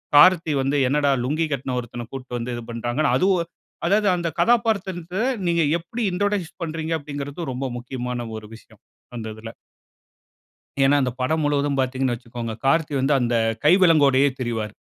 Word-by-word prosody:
கார்த்தி 165 +1 +6
வந்து 135 +2 0
என்னடா 145 +2 +2
லுங்கி 155 +6 0
கட்ன 135 -1 -2
ஒருத்தன 120 0 -7
கூட்டிட்டு 130 -2 -6
வந்து 120 +1 -4
இது 120 - -7
பண்றாங்க. 120 +4 -2 0.2
அதுவும் 185 -3 +2 0.4
அதாவது 205 +3 +3
அந்த 170 -1 -2
கதாபாத்திரத்த 200 -7 +1 0.3
நீங்க 170 -1 +2 0.2
எப்படி 205 +9 -6
இன்ட்ரோடியூஸ் 200 -1 -1
பண்றீங்க 165 0 -3
அப்டிங்கிறது 145 +2 -6
ரொம்ப 130 +2 -3
முக்கியமான 125 -1 -5
ஒரு 110 -1 -10
விஷயம் 115 - -19 0.3
அந்த 115 -2 -5
இதில. 115 +1 -9 1.3
ஏன்னா, 135 +2 +5
அந்த 125 -1 0
படம் 155 +5 +1
முழுவதும் 145 -1 +1
பாத்தீங்கன்னு 130 -1 0
வச்சிக்கோங்க, 115 -1 -6
கார்த்தி 150 +2 +2
வந்து 135 +3 +2
அந்த 120 -1 0 0.3
கை 155 - +7
விலங்கோடயே 140 -5 +5
திரிவாரு. 115 -4 -3
140 Hz, 150 wpm, -23 LUFS, 125-165 Hz, 1.3 s, கை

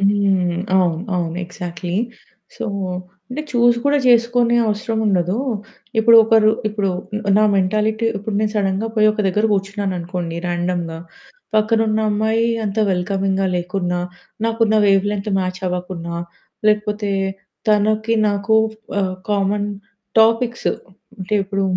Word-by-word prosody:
హ్మ్, 195 -3 +2 0.2
అవును. 175 -3 +2 0.2
అవును. 170 -1 -2
ఎగ్జాక్ట్‌లీ. 175 0 -5 0.6
సో, - - -4 0.6
అంటే 275 +5 -4
చూసి 240 0 +4
కూడా 285 +1 +3
జేసుకునే 240 0 +4
అవసరముండదు. 210 -4 0 0.6
ఇప్పుడు 230 +1 +7
ఒకరు 220 -1 +5 0.2
ఇప్పుడు 205 -2 -1 0.5
నా - - +4
మెంటాలిటీ 215 +4 +1
ఇప్పుడు 205 +1 -5
నేను 215 -1 0
సడెన్‌గా 195 +1 0
పోయి 215 -1 +4
ఒక 215 - -3
దగ్గర 210 +3 +1
కూర్చున్నాననుకోండి, 185 -4 -3
రాండమ్‌గా. 175 -1 -2 0.6
పక్కనున్న 220 0 +2
అమ్మాయి 220 +2 +1 0.2
అంత 205 +1 -3
వెల్కమింగ్‌గా 195 +1 0
లేకున్నా, 180 0 -2 0.5
నాకున్న 225 -1 +1
వేవ్ 195 -1 +4
లెంత్ 210 0 -3
మ్యాచ్ 185 0 -3
అవ్వకున్నా, 180 -1 -4 0.5
లేకపోతే 210 -1 0 0.6
తనకి 215 +2 +2
నాకు 205 +2 0 0.5
ఆహ్, 185 -1 -1 0.2
కామన్ 205 0 +1 0.5
టాపిక్స్ 230 +2 +2 0.5
అంటే 190 +2 -3
ఇప్పుడు 195 0 -2
205 Hz, 115 wpm, -19 LUFS, 185-220 Hz, 0.6 s, ఇప్పుడు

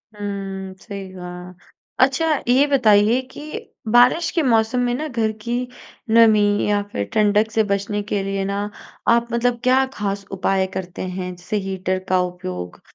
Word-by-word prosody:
हुँ 195 -2 -5
सही 200 -2 -7
कहा। 180 0 -8 0.5
अच्छा 270 +4 -1 0.2
ये 255 +4 +5
बताइए 230 -3 +4
कि - - -10 0.5
बारिश 250 +8 +5
के 335 - +1
मौसम 230 -1 +2
में 245 - 0
ना 305 +4 -3
घर 230 -5 0
की 235 +2 -3 0.6
नमी 225 -1 +6 0.3
या 205 0 +2
फ़िर 100 - -2
ठंडक 210 +1 +3
से 220 0 +2
बचने 200 +1 -1
के 205 - +1
लिए 195 0 -2
ना 200 +1 -2 0.5
आप 235 0 +4
मतलब 240 0 +1
क्या 260 +1 +4
ख़ास 200 -2 -3
उपाय 195 0 +1
करते 185 -2 -5
हैं, 185 0 -4
जैसे 180 +4 -4
हीटर 185 -1 -2
का 185 0 +3
उपयोग 90 - -5
205 Hz, 160 wpm, -21 LUFS, 190-235 Hz, 0.6 s, नमी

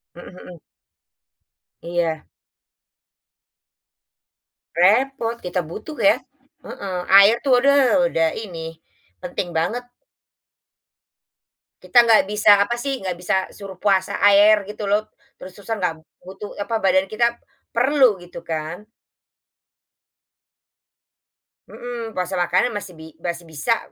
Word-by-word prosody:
Mhm 175 +1 -12
mhm. 175 -3 -13 1.2
Iya. 170 -2 -2 2.5
Repot 230 +6 +2
kita 180 +1 -2
butuh 280 - -8
ya, 295 - +5 0.5
heeh, 195 -2 -7 0.2
air 205 +4 +6
tuh 255 -3 +4
udah 275 0 +3
udah 165 -10 +1
ini 165 -6 -8 0.4
penting 180 0 -5
banget. 210 +10 -1 2.0
Kita 240 -1 +4
nggak 215 -3 +4
bisa 210 -1 +5
apa 240 +4 0
sih 270 +2 -4
nggak 185 -2 -4
bisa 180 +1 -1
suruh 195 -2 -10
puasa 195 -2 0
air 205 +1 +6
gitu 210 0 -6
loh, 210 +2 0 0.3
terus-terusan 200 +3 -7
nggak 175 -2 0 0.3
butuh 190 +3 -10
apa 225 +2 -2
badan 190 -2 +1
kita 235 +2 0 0.3
perlu 250 -5 +3
gitu 175 0 -11
kan. 160 +5 -5 2.8
Mhm, 235 -3 -7
puasa 180 +1 -3
makanan 185 +7 +1
masih 190 -5 -7
bi 160 0 -12
masih 170 0 -5
bisa 165 +9 -1
200 Hz, 110 wpm, -21 LUFS, 175-230 Hz, 2.8 s, air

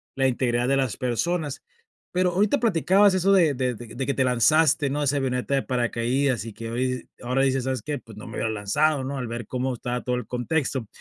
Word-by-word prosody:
la 135 0 +2
integridad 120 -1 0
de 135 - +3
las 130 -4 -1
personas. 145 +5 -1 0.5
Pero 180 0 +2
ahorita 210 +8 +2
platicabas 200 -1 +4
eso 185 +1 +2
de 170 -7 +4
de 125 -1 0
de 120 +3 -6
que 140 - 0
te 130 - +1
lanzaste, 140 +4 +3
¿no?, 145 +2 -2
de - - +1
esa 145 +1 +1
avioneta 130 0 -1
de 135 - 0
paracaídas 125 +1 0
y 115 - -7
que 115 +1 -7
hoy 125 +1 -2
ahora 130 +2 +1
dices: 135 -1 +1
"¿Sabes 130 -4 -1
qué? 145 +3 -3
Pues 110 -3 -14
no 110 - -9
me 115 - -9
hubiera 110 - -1
lanzado", 130 +8 +1
¿no?, 140 +1 -4
al 125 -2 -3
ver 120 0 -5
cómo 130 0 -2
estaba 120 +1 -3
todo 125 -1 -1
el 125 - -4
contexto. 130 -2 -1
130 Hz, 225 wpm, -25 LUFS, 120-145 Hz, 0.5 s, platicabas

